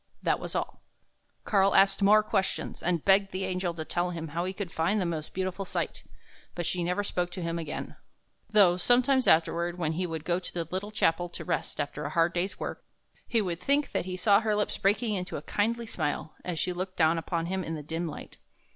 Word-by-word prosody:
That - - +2
was - - -6
all. - - -3 0.6
Karl 195 -2 +3
asked 195 +1 +5
more 210 +2 +6
questions, 195 -2 -1
and 175 -3 0
begged 195 0 +4
the 190 +1 -2
angel 185 -1 -1
to 160 -1 -5
tell 175 +2 -1
him 165 -2 -5
how 170 +4 -2
he 185 - -2
could 190 -2 -5
find 170 +7 +1
the 185 - 0
most 160 -3 -3
beautiful 185 +1 -2
sight, 190 - -3 0.5
but 175 - -3
she 175 +1 -1
never 180 +4 0
spoke 180 -3 -1
to 185 - -5
him 170 0 -2
again, 155 -2 -5 0.5
though 200 -5 +5
sometimes 255 +5 +3
afterward, 170 +2 +3
when 160 -3 0
he 180 +3 -1
would 160 -2 -5
go 175 0 +1
to 185 - -7
the 165 -2 -2
little 190 +3 -3
chapel 175 -4 +1
to - - -7
rest 165 -3 -2
after 145 0 -3
a 145 - -2
hard 165 +2 +2
day's 180 +3 -2
work, - - -5 0.4
he 230 -3 +2
would 175 -3 -3
think 280 +8 +1
that - - -1
he 185 0 -4
saw 200 +2 +5
her 215 -2 0
lips 210 0 0
breaking 210 +3 +1
into 180 -2 -3
a 145 - -7
kindly 230 +6 0
smile, 155 -6 -3
as 175 -2 -3
she 180 - 0
looked 185 +1 -5
down 165 0 +4
upon 165 0 -2
him 190 +2 -2
in 165 -1 -4
the 150 - -6
dim 165 +3 -3
light. 155 - -9
180 Hz, 225 wpm, -29 LUFS, 165-195 Hz, 0.6 s, more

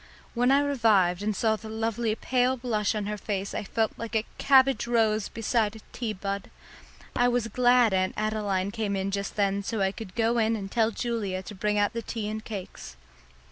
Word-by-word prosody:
When 245 +1 +2
I 275 +1 +5
revived 215 -10 +3
and 210 0 -1
saw 220 +2 +2
the 220 0 -9
lovely 225 0 -1
pale 255 +2 +1
blush 225 -4 -1
on 210 -1 -2
her 210 0 -4
face 195 -1 -3
I - - -3
felt 220 +2 0
like 230 0 -5
a 220 0 +1
cabbage 270 -2 +4
rose 220 -3 +2
beside 225 -1 0
a - - -9
tea 235 -2 -3
bud. 200 0 -4 0.7
I 245 - +4
was 245 -2 +1
glad 245 -3 +4
Aunt 185 0 +1
Adeline 205 -3 -1
came 210 -2 -2
in 195 0 -2
just 200 0 -3
then 200 -1 +1
so 220 +2 -3
I 190 -1 +2
could 200 -3 -9
go 230 +1 +2
in 225 0 +2
and 195 -2 -6
tell 225 -1 +2
Julia 215 -5 -3
to 210 - -8
bring 210 +1 -1
out 205 0 +2
the 230 - -3
tea 220 -1 -4
and 215 0 -4
cakes. 190 - -8
220 Hz, 205 wpm, -27 LUFS, 200-235 Hz, 0.7 s, I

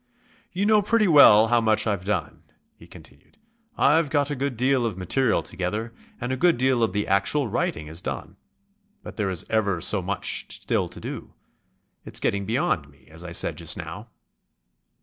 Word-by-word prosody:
"You 190 +2 -1
know 215 0 +4
pretty 215 +1 +2
well 115 - +7
how 120 -1 +3
much 110 -1 +1
I've 100 -4 -2
done," 100 -4 -3 0.3
he - - -17
continued. 70 - -17 0.4
"I've 150 +1 +3
got 145 -1 0
a - - -2
good 135 -2 -3
deal 130 +1 +2
of 110 -6 -2
material 110 +7 +1
together 105 +5 -4 0.3
and 125 +1 -4
a 130 - -1
good 175 +2 +3
deal 130 -1 +1
of 110 -4 +2
the 105 +2 -1
actual 100 +8 +1
writing 80 -6 -2
is 80 +3 -5
done. - - -6 0.7
But - - -9
there 105 -3 -1
is 95 -1 -1
ever 100 -5 0
so 95 +4 +2
much 95 +2 -3
still - - -1
to - - -10
do. - - -8 0.7
It's - - -5
getting 100 -1 -1
beyond 115 - -1
me, 70 -1 -24
as 80 +2 -10
I 90 - -8
said 85 - -2
just - - -1
now." - - -8
110 Hz, 185 wpm, -24 LUFS, 95-135 Hz, 0.7 s, well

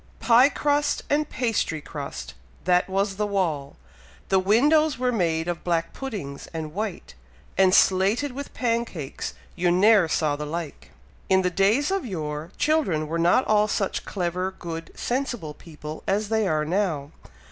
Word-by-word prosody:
"Pie 235 +4 +6
crust 290 0 0
and 295 0 +1
pastry 225 -10 -1
crust, 140 - -7 0.3
that 180 +1 +2
was 195 +1 0
the 210 0 0
wall; 165 -9 -1 0.5
The 190 - +4
windows 290 +10 +3
were 250 0 +1
made 165 -6 0
of 175 -1 -3
black 165 -1 -1
puddings 195 - -6
and 155 -1 -5
white, 205 -1 -4 0.4
And 190 0 +5
slated 195 +10 +3
with 280 +3 -7
pancakes 230 - -2 0.2
you 180 0 +1
ne'er 195 +1 +5
saw 155 -2 +1
the 150 0 -5
like!" 165 -1 -6 0.4
In 190 0 +4
the 180 - +1
days 210 - +2
of 390 -3 0
yore, 155 - -4
children 290 - +1
were 165 +2 -2
not 175 +9 +4
all 210 0 +3
such 200 -2 -1
clever, 180 0 -2
good 165 -1 -6
sensible 240 - -3
people 155 -1 -9
as 205 +2 0
they 220 -2 +1
are 155 -3 +1
now! 160 -5 -1
190 Hz, 155 wpm, -25 LUFS, 160-230 Hz, 0.5 s, Pie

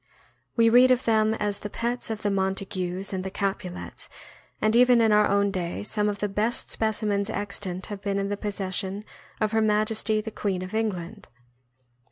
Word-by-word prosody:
We 230 -1 +5
read 245 +3 +7
of 255 0 +3
them 220 -1 +3
as 205 -2 -2
the 210 - -6
pets 235 +3 -1
of 220 -1 -4
the 205 - +1
Mon 190 0 +1
tagues 190 0 -4
and 185 -1 -2
the 190 - -3
Capulets, 190 -2 -4 0.5
and 215 +1 +2
even 245 0 +6
in 225 -1 +4
our 210 0 +5
own 200 0 +2
day 180 -2 -3
some 210 0 0
of 205 - -3
the 205 - -1
best 210 +4 -1
specimens 210 -2 0
extant 200 -3 -4
have 205 -2 -7
been 200 -1 -1
in 200 0 -1
the 205 - -1
possession 200 0 -3 0.3
of 215 -1 +1
Her 220 0 +2
Majesty 215 0 +2
the 220 +1 -5
Queen 190 -4 -2
of 185 - -8
England. 205 - -3
205 Hz, 190 wpm, -26 LUFS, 195-220 Hz, 0.5 s, read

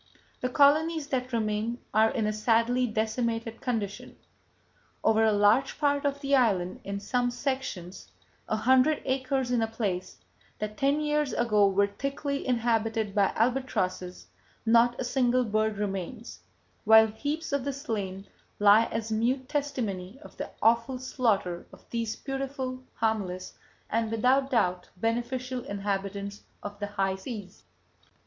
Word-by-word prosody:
The 250 - -1
colonies 305 +3 +3
that 255 -1 -2
remain 220 0 -1 0.2
are 220 +1 +5
in 220 -2 -1
a 215 - 0
sadly 230 +3 +2
decimated 225 +1 -2
condition.… 220 -5 -3 0.9
Over 220 0 +4
a 220 - +4
large 210 +6 +3
part 285 -1 +1
of 280 0 -1
the 280 -1 +2
island, 195 -8 +1
in 200 0 -4
some 245 +4 0
sections 245 -8 -4 0.4
a - - +1
hundred 260 +7 +3
acres 260 -1 0
in 240 -2 +2
a 225 - +1
place, 200 -5 -3 0.4
that 210 0 -4
ten 280 +5 +1
years 300 -1 0
ago 210 -4 +3
were 195 +1 +3
thickly 275 +7 -3
inhabited 225 -3 0
by 200 -2 +3
albatrosses 185 - -1 0.4
not 235 +1 +4
a - - -1
single 250 0 +2
bird 215 -1 0
remains, 200 +2 -4 0.4
while 220 0 +8
heaps 285 +8 -4
of 280 -2 +1
the 280 - -1
slain 205 -9 -4 0.3
lie 205 +2 +6
as 225 -1 -4
mute 250 +4 0
testimony 240 -9 -3
of - - -13
the - - -5
awful 235 +3 +3
slaughter 220 -9 -1
of - - -17
these 230 -2 -2
beautiful, 270 -1 -4
harmless, 200 -5 -2 0.3
and 225 0 0
without 255 +5 +2
doubt 180 -7 +1
beneficial 240 +4 -2
inhabitants 200 0 -3 0.2
of 205 0 -7
the 205 - -2
high 195 -2 -1
seas. 200 -2 -8
230 Hz, 140 wpm, -28 LUFS, 205-260 Hz, 0.9 s, while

